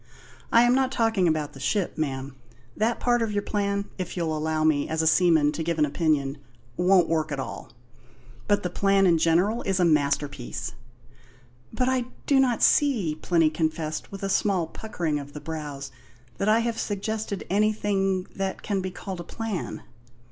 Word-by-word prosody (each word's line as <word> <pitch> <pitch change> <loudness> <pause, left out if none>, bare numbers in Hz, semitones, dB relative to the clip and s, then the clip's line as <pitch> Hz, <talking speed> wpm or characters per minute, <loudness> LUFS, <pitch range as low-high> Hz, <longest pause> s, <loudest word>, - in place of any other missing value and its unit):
I 230 - +6
am 240 0 +4
not 260 0 +2
talking 225 -7 +2
about 155 -2 -1
the 135 - -11
ship, 180 +8 -1
ma'am. 135 -3 -3 0.4
That 225 +2 0
part 240 -1 +2
of 225 -2 0
your 205 -1 -1
plan 200 -1 -1
(if 185 0 -4
you'll 165 -2 -1
allow 155 0 -1
me, 155 -2 +2
as 160 0 0
a - - 0
seaman, 160 -2 +4
to 155 - -4
give 165 0 -1
an 150 - +4
opinion) 145 -2 0 0.4
won't 180 +1 +4
work 160 -2 0
at 140 - -3
all. 125 -2 -6 0.8
But 205 -1 +2
the 180 - -2
plan 195 +1 +3
in 170 -3 +4
general 175 +8 +2
is 195 -1 -1
a 180 - +4
masterpiece." 140 -6 0 1.0
"But 250 - 0
I 260 -1 +1 0.2
do 275 -2 +4
not 250 -3 +2
see," 235 - +3
Plinny 160 0 +2
confessed, 155 -1 -2
with 195 0 -8
a 195 - -1
small 190 -3 +1
puckering 165 -5 -3
of 145 0 -10
the 150 - -6
brows, 145 -3 -6 0.5
"that 200 - +1
I 220 +2 +4
have 230 -1 -2
suggested 210 0 -3
anything 200 -2 +1
that 195 0 -3
can 200 -2 -1
be 185 - -3
called 185 0 -7
a - - -5
plan." 215 0 -5
180 Hz, 180 wpm, -26 LUFS, 155-205 Hz, 1.0 s, I